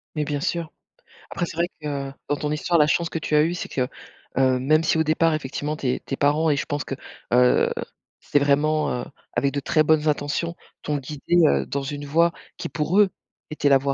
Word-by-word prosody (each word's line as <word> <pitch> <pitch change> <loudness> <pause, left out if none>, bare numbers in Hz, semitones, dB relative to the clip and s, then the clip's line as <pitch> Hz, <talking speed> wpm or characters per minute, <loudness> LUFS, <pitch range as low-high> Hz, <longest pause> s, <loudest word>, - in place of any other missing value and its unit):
Mais 150 -1 0
bien 145 -1 -2
sûr. 170 +1 -2 0.6
Après 175 - -1
c'est 165 - -8
vrai 170 +1 +2
que, 140 -2 -3 0.2
dans 145 - +2
ton 150 0 -3
histoire, 160 +3 +1
la 150 -2 +5
chance 170 +2 +1
que 165 - -3
tu 155 - -1
as 150 - +6
eue, 165 +2 0
c'est 180 - -5
que, 125 -2 -1 0.5
heu, 130 -1 +3
même 155 +5 +3
si 160 - +2
au 160 - +3
départ 160 +1 +2
effectivement 150 0 -3
tes 130 -3 -1
tes 135 - -5
parents 150 +3 +2
et 145 - +2
je 140 - -2
pense 145 -1 -2
que, 135 - -5 0.4
heu, 125 0 +4 0.5
c'est 145 - +1
vraiment, 150 +2 +2
heu, - - -8 0.3
avec 140 0 +1
de 145 - 0
très 155 +3 +2
bonnes 155 0 +3
intentions, 150 +3 -1 0.3
t'ont 150 -1 -1
guidée, 145 +5 -1
heu, 70 -1 +2
dans 140 - -3
une 145 +1 -5
voie 165 +4 +3 0.2
qui - - -4
pour 165 +6 +1
eux 205 -2 +6 0.4
était 150 -2 +1
la 135 - +7
voie 140 +1 -1
150 Hz, 225 wpm, -24 LUFS, 140-160 Hz, 0.6 s, la